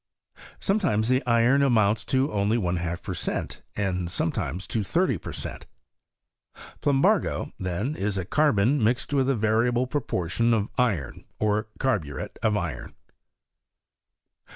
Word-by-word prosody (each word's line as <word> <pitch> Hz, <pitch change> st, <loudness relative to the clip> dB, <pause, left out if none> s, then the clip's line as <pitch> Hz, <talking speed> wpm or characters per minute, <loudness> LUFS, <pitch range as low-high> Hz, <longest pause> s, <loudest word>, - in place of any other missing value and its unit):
Sometimes 145 Hz, -, +1 dB
the 130 Hz, +2 st, +2 dB
iron 120 Hz, +4 st, +4 dB
amounts 110 Hz, -5 st, +2 dB
only 110 Hz, -5 st, +2 dB
to -, -, +1 dB
one 90 Hz, -1 st, 0 dB
half 85 Hz, 0 st, -3 dB
per -, -, -4 dB
cent., -, -, -3 dB
and 90 Hz, -3 st, -1 dB
sometimes 90 Hz, +1 st, -2 dB
to 110 Hz, -4 st, -2 dB
thirty 165 Hz, -, +1 dB
per -, -, -7 dB
cent. -, -, -7 dB, 1.1 s
Plumbago, 140 Hz, -1 st, +2 dB
then, 95 Hz, -, -2 dB
is 100 Hz, -4 st, -1 dB
carbon 140 Hz, -3 st, +3 dB
mixed 120 Hz, +5 st, +1 dB
with 135 Hz, -1 st, +2 dB
a 135 Hz, -, +3 dB
variable 115 Hz, +3 st, +2 dB
proportion 115 Hz, -, 0 dB
of 105 Hz, -2 st, -1 dB
iron, 100 Hz, -, -1 dB
or 105 Hz, 0 st, 0 dB
carburet 85 Hz, -, -2 dB
of 105 Hz, -1 st, +2 dB
iron. 80 Hz, -10 st, -5 dB
110 Hz, 130 wpm, -26 LUFS, 95-130 Hz, 1.1 s, iron